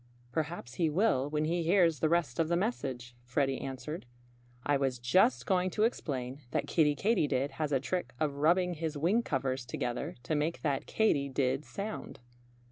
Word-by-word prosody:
"Perhaps 155 -3 -3
he 165 - +4
will 150 -6 +2
when 150 0 0
he 170 +2 0
hears 170 -3 +3
the 155 - +2
rest 165 -6 +1
of 165 - +3
the 170 - +1
message," 130 - -3
Freddie 135 +2 0
answered. 135 +2 -6 0.6
"I 145 - +3
was 135 -2 0
just 160 - +3
going 185 -2 +2
to 210 +4 0
explain 135 - -2
that - - -1
Kiddie 150 -3 +3
Katydid 145 - +1
has 150 -1 0
a 135 - +3
trick 135 -2 -3
of 145 -2 0
rubbing 175 +4 +3
his 160 -2 -3
wing 180 +10 +3
covers 135 - -1
together 120 0 -3
to 140 - -2
make 155 +3 -1
that 140 -4 0
Katy 145 -11 +2
did 135 +1 0
sound." 210 +2 -6
150 Hz, 175 wpm, -31 LUFS, 135-175 Hz, 0.6 s, he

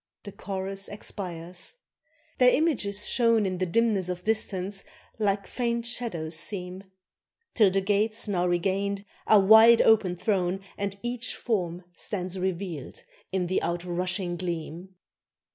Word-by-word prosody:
The 200 - -8
chorus 195 0 -4
expires: 180 - -6 0.6
their 250 -1 +7
images 230 -10 +1
shown 230 -3 +3
In 185 -2 -2
the 185 - 0
dimness 200 -1 +1
of 180 0 -4
distance 195 -2 -1 0.4
like 200 -1 +1
faint 235 -1 -2
shadows 175 -10 -3
seem; 180 +2 -4 0.7
Till 210 -5 +5
the 195 +1 +1
gates 210 +3 0
now 180 -3 +1
regained 195 +3 0 0.2
are 215 - +7
wide 220 +4 +8
open 215 -5 +4
thrown, 190 -1 0
And 200 0 -3
each 240 0 -2
form 180 -6 -2
stands 185 -1 -4
revealed 180 -5 -4 0.3
in 185 -1 0
the 185 +2 0
outrushing 175 +1 -2
gleam. 175 +1 -5
195 Hz, 125 wpm, -27 LUFS, 180-215 Hz, 0.7 s, wide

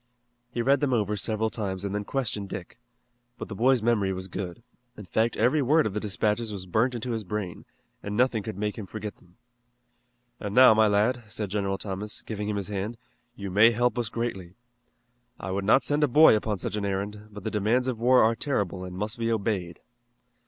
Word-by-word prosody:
He 120 -1 -2
read 135 +2 +4
them 135 -2 +1
over 105 -3 +1
several 110 +2 -1
times 100 -3 -3
and 100 - -3
then 105 0 -2
questioned 110 -7 -3
Dick. 90 +6 -8 0.6
But - - -7
the 105 - -5
boy's 125 +2 +3
memory 110 -5 +2
was 95 0 -5
good. 95 +3 -6 0.3
In 105 - -9
fact, 110 +6 0
every 125 +7 +3
word 150 +4 +3
of 105 - -2
the 105 - -1
dispatches 105 +2 -1
was 95 -3 -6
burnt 115 +7 +1
into 120 +1 -4
his 110 -2 -2
brain, 100 -2 -5 0.4
and 105 0 -4
nothing 125 -3 +2
could 110 -1 -6
make 105 +1 -2
him 100 - -7
forget 105 -1 -6
them. 90 0 -25 1.0
"And 105 -1 -5
now, 130 -2 +9
my 110 0 +4
lad," 105 +5 +2
said 105 -2 -4
General 100 -1 -1
Thomas, 105 +2 -4
giving 105 -1 -4
him 105 - -1
his 100 -1 -3
hand, 105 +3 -3 0.4
"you 100 -4 -6
may 105 +5 +7
help 120 +2 +1
us 115 -2 -1
greatly. 95 -7 -4 0.8
I 95 - -5
would 95 +1 -2
not 115 +6 +5
send 145 +1 +1
a - - +5
boy 150 -1 +7
upon 105 -1 -1
such 95 - -3
an 105 - -2
errand, 100 +2 -3
but 105 -2 -10
the 110 - -3
demands 115 +5 +1
of 125 -4 -2
war 125 +2 +5
are 115 +1 +3
terrible 100 - -2
and 90 0 -7
must 105 +4 -4
be 115 0 0
obeyed." 100 -6 -2
105 Hz, 210 wpm, -27 LUFS, 100-115 Hz, 1.0 s, now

